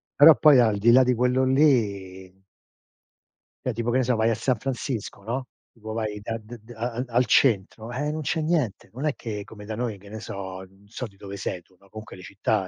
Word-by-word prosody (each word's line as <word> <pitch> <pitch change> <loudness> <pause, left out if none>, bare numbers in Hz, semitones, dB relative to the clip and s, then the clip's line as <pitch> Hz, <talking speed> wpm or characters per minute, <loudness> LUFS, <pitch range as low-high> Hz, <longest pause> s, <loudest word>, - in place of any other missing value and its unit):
però 150 +2 +9
poi 150 -4 +7
al 110 -4 +3
di 115 +3 +5
là 130 +2 +7
di 125 - +2
quello 125 +2 +2
lì 100 -9 +1 1.2
Cioè 125 - -1
tipo 115 +1 -2
che 125 - +2
ne 130 - +2
so 125 0 +1
vai 110 +1 +2
a 115 - +1
San 125 +2 0
Francisco, 125 -4 -4
no, 125 +4 -3 0.2
tipo 110 -1 -8
vai 110 -2 -3
da 115 +2 -4
d 115 +2 -11
d 110 +3 -15
a 120 +2 -3
a 125 - -1
al 125 +1 +2
centro, 110 -1 +2
eh 145 +4 -2
non 155 +1 -4
c'è 160 +2 -1
niente. 155 - -1
Non 130 +6 -5
è 150 - +1
che, 105 -4 -5
come 105 -2 -12
da 110 +1 -5
noi 115 -2 -3
che 100 +1 -15
ne 110 - -7
so, 95 -3 -7
non 95 +1 -23
so 120 +4 -6
di 100 - -21
dove 100 0 -8
sei 90 -2 -4
tu, 95 - -29
no, 100 - -22
comunque 110 -2 -10
le 90 - -12
città 100 +1 -1
115 Hz, 235 wpm, -25 LUFS, 100-125 Hz, 1.2 s, però